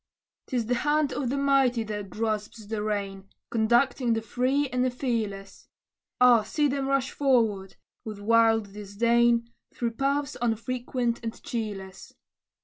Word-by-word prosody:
'Tis 245 Hz, -3 st, -1 dB
the 245 Hz, -, 0 dB
hand 295 Hz, -1 st, +1 dB
of 260 Hz, -4 st, -2 dB
the 275 Hz, -, -1 dB
mighty 270 Hz, -4 st, +2 dB
that 210 Hz, -2 st, -5 dB
grasps 215 Hz, +1 st, -3 dB
the 215 Hz, 0 st, -3 dB
rein, 200 Hz, -2 st, -3 dB, 0.2 s
Conducting 240 Hz, +2 st, +2 dB
the 225 Hz, -, -1 dB
free 260 Hz, +6 st, 0 dB
and 250 Hz, 0 st, 0 dB
the 255 Hz, -, +2 dB
fearless. 220 Hz, -6 st, -4 dB, 0.5 s
Ah! 250 Hz, -2 st, +6 dB
see 290 Hz, +8 st, 0 dB
them 275 Hz, -1 st, -2 dB
rush 275 Hz, -2 st, 0 dB
forward, 225 Hz, -9 st, +1 dB, 0.3 s
with 215 Hz, -2 st, -7 dB
wild 225 Hz, -1 st, +3 dB
disdain, 235 Hz, +3 st, +1 dB, 0.2 s
Through 235 Hz, -1 st, -1 dB
paths 280 Hz, +4 st, -1 dB
unfrequented 240 Hz, +1 st, -2 dB
and 225 Hz, 0 st, -6 dB
cheerless. 200 Hz, -5 st, -6 dB
235 Hz, 140 wpm, -27 LUFS, 215-255 Hz, 0.5 s, Ah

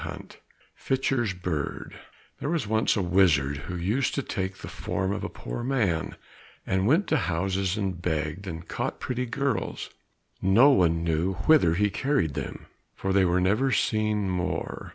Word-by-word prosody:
46 -, -, -8 dB, 0.4 s
Fitcher's 130 Hz, -5 st, 0 dB
Bird 85 Hz, -5 st, -4 dB, 0.5 s
There 140 Hz, -, -3 dB
was 165 Hz, -5 st, 0 dB
once 110 Hz, +1 st, +2 dB
a 100 Hz, -, +1 dB
wizard 85 Hz, -7 st, +3 dB
who 90 Hz, -, -3 dB
used 105 Hz, +10 st, 0 dB
to 140 Hz, -, -1 dB
take 95 Hz, -5 st, -3 dB
the -, -, -9 dB
form 95 Hz, +1 st, -2 dB
of 100 Hz, -1 st, -4 dB
a 105 Hz, -, -3 dB
poor 120 Hz, -, -6 dB
man, 110 Hz, -11 st, 0 dB, 0.5 s
and 95 Hz, +1 st, +1 dB
went 165 Hz, -, +4 dB
to -, -, +3 dB
houses 95 Hz, +3 st, -1 dB
and 95 Hz, -4 st, -2 dB
begged, 80 Hz, +3 st, -2 dB
and 80 Hz, -1 st, -6 dB
caught -, -, -3 dB
pretty 125 Hz, 0 st, -2 dB
girls. 135 Hz, +3 st, -2 dB, 0.5 s
No 115 Hz, +10 st, +6 dB
one 85 Hz, -8 st, +3 dB
knew 85 Hz, +3 st, 0 dB
whither 140 Hz, -, +5 dB
he 105 Hz, +2 st, +2 dB
carried 115 Hz, -, 0 dB
them, -, -, -6 dB, 0.3 s
for 95 Hz, 0 st, -2 dB
they 95 Hz, -1 st, +4 dB
were 90 Hz, +1 st, +2 dB
never 105 Hz, +9 st, +2 dB
seen 110 Hz, -2 st, +1 dB
more. 90 Hz, -1 st, -3 dB
95 Hz, 165 wpm, -27 LUFS, 85-115 Hz, 0.5 s, No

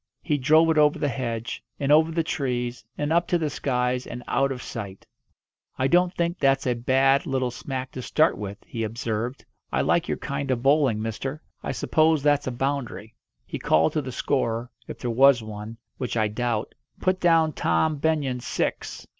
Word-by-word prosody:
He 150 Hz, -3 st, 0 dB
drove 155 Hz, +4 st, +5 dB
it 155 Hz, -, +3 dB
over 150 Hz, 0 st, +4 dB
the -, -, 0 dB
hedge, 120 Hz, -3 st, -4 dB, 0.2 s
and 140 Hz, -1 st, 0 dB
over 160 Hz, +2 st, +5 dB
the 165 Hz, 0 st, 0 dB
trees, 125 Hz, -6 st, -2 dB
and 150 Hz, +2 st, 0 dB
up 170 Hz, +1 st, +2 dB
to 175 Hz, -, +2 dB
the 155 Hz, -3 st, -2 dB
skies, 125 Hz, -2 st, -1 dB
and 120 Hz, +1 st, -7 dB
out 135 Hz, +2 st, +1 dB
of 125 Hz, -2 st, -5 dB
sight. 100 Hz, -4 st, -7 dB, 0.7 s
"I 130 Hz, -, +1 dB
don't 175 Hz, +3 st, +3 dB
think 170 Hz, +1 st, -1 dB
that's 135 Hz, 0 st, +2 dB
a 125 Hz, -, +2 dB
bad 135 Hz, +3 st, +2 dB
little 130 Hz, -2 st, 0 dB
smack 130 Hz, +1 st, -5 dB
to 130 Hz, -, -6 dB
start 155 Hz, +6 st, +2 dB
with," 100 Hz, -1 st, -6 dB
he 115 Hz, -, -5 dB
observed. 115 Hz, +3 st, -3 dB, 0.3 s
"I -, -, +1 dB
like -, -, +1 dB
your -, -, -1 dB
kind 140 Hz, 0 st, -4 dB
of 125 Hz, -2 st, 0 dB
bowling, 135 Hz, -6 st, +3 dB
mister. 135 Hz, +7 st, -4 dB, 0.2 s
I -, -, -3 dB
suppose 155 Hz, -2 st, +2 dB
that's 145 Hz, -1 st, +2 dB
a -, -, 0 dB
boundary." 120 Hz, -5 st, -3 dB, 0.3 s
He -, -, -6 dB
called 80 Hz, +1 st, +3 dB
to 155 Hz, -, 0 dB
the 130 Hz, -2 st, -6 dB
scorer 120 Hz, -2 st, -1 dB, 0.2 s
if -, -, -7 dB
there 120 Hz, -, -3 dB
was 130 Hz, 0 st, +5 dB
one, 110 Hz, +1 st, -8 dB, 0.2 s
which 125 Hz, -2 st, -2 dB
I 110 Hz, -1 st, +2 dB
doubt 115 Hz, 0 st, -2 dB, 0.3 s
"Put 185 Hz, 0 st, +1 dB
down 165 Hz, -3 st, +3 dB
Tom 130 Hz, -, +1 dB
Benyon 140 Hz, -4 st, 0 dB
six!" -, -, -3 dB
130 Hz, 190 wpm, -25 LUFS, 120-150 Hz, 0.7 s, drove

